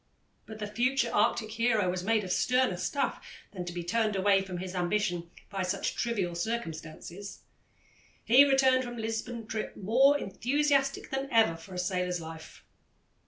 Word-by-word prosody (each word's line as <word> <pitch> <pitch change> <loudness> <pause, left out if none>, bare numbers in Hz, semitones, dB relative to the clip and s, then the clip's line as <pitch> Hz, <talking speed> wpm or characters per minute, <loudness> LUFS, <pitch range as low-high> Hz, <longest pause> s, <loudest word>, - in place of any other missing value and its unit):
But 220 - -8
the 215 - -4
future 245 +6 0
Arctic 215 -2 +1
hero 225 -3 +1
was 180 0 -2
made 220 +2 +2
of 185 - -5
sterner 250 -5 +2
stuff 275 +9 -2 0.3
than 180 -3 -6
to 175 - -5
be 175 0 -5
turned 215 +4 0
away 195 0 +3
from 190 -2 -6
his 185 +1 -5
ambition 175 -2 -1 0.2
by 195 -1 -2
such 185 +1 -1
trivial 200 -7 -1
circumstances. 170 -1 -5 0.8
He 250 +5 +8
returned 265 -2 +4
from 240 -1 -6
the 230 - -5
Lisbon 225 +1 -4
trip 215 0 -5
more 260 +8 +4
enthusiastic 275 +5 0
than 270 +1 -2
ever 225 -8 +4
for 165 +3 -11
a - - -5
sailor's 180 -1 -1
life. 160 0 -10
210 Hz, 165 wpm, -29 LUFS, 180-240 Hz, 0.8 s, He